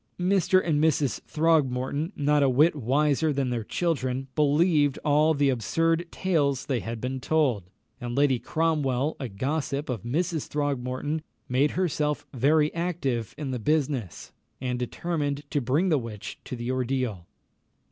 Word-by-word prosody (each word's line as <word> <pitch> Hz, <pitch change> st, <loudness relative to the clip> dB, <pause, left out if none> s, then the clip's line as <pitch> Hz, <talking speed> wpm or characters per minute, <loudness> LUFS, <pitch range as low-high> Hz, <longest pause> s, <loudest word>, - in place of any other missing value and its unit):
Mr. 185 Hz, 0 st, +3 dB
and 150 Hz, -2 st, +2 dB
Mrs. 150 Hz, -4 st, +1 dB
Throgmorton, 150 Hz, -1 st, +1 dB
not 145 Hz, 0 st, +2 dB
a 140 Hz, -, +4 dB
whit 150 Hz, +6 st, +4 dB
wiser 145 Hz, +4 st, +1 dB
than 135 Hz, -3 st, -1 dB
their 120 Hz, -2 st, -2 dB
children, 135 Hz, -3 st, -1 dB
believed 150 Hz, 0 st, +3 dB
all 150 Hz, +2 st, +4 dB
the 140 Hz, -1 st, +3 dB
absurd 165 Hz, +7 st, +1 dB
tales 145 Hz, -9 st, 0 dB
they 130 Hz, -4 st, 0 dB
had 115 Hz, 0 st, -5 dB
been 130 Hz, +3 st, -3 dB
told; 125 Hz, -, +1 dB, 0.3 s
and 120 Hz, -1 st, -4 dB
Lady 140 Hz, -3 st, +3 dB
Cromwell, 150 Hz, -3 st, 0 dB
a 130 Hz, -4 st, -4 dB
gossip 140 Hz, +6 st, -2 dB
of 120 Hz, -6 st, -2 dB
Mrs. 160 Hz, -, -1 dB
Throgmorton, 145 Hz, +1 st, -2 dB, 0.3 s
made 135 Hz, +4 st, +2 dB
herself 150 Hz, -5 st, 0 dB
very 150 Hz, +4 st, +3 dB
active 155 Hz, -, -2 dB
in 145 Hz, -3 st, -4 dB
the 125 Hz, -, -3 dB
business, 135 Hz, -, -1 dB, 0.3 s
and 125 Hz, -1 st, -2 dB
determined 145 Hz, +2 st, -2 dB
to 145 Hz, -, +1 dB
bring 145 Hz, +10 st, +1 dB
the 155 Hz, -4 st, +3 dB
witch 110 Hz, -4 st, -7 dB
to -, -, -5 dB
the 120 Hz, +1 st, -3 dB
ordeal. 125 Hz, -8 st, -2 dB
145 Hz, 145 wpm, -26 LUFS, 125-155 Hz, 0.3 s, a